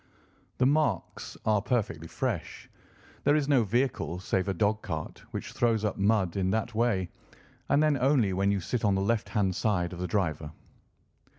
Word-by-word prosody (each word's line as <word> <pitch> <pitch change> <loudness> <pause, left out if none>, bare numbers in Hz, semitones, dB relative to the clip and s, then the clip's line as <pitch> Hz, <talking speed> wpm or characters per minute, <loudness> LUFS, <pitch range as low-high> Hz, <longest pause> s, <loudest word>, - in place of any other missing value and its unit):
The 125 - +3
marks 135 - 0
are 105 -2 +3
perfectly 100 -8 -1
fresh. - - -4 0.6
There 145 - +4
is 150 -2 +1
no 135 -5 +4
vehicle 115 -5 -1
save 95 +1 -1
a 95 - 0
dog 105 +4 +1
cart 80 -4 -5
which - - -6
throws 115 -3 +1
up 105 - -1
mud 100 -3 +1
in 95 -1 +1
that 110 +3 -1
way, 110 -6 0 0.6
and 145 - +4
then 155 -1 +3
only 125 -7 +3
when 100 +2 +1
you 100 -1 +1
sit 120 +6 -2
on 100 -2 +3
the 95 - 0
left 110 +2 0
hand 95 -3 0
side 90 -5 0
of 90 - -8
the 90 - -2
driver." 80 -5 -1
105 Hz, 180 wpm, -28 LUFS, 95-120 Hz, 0.6 s, There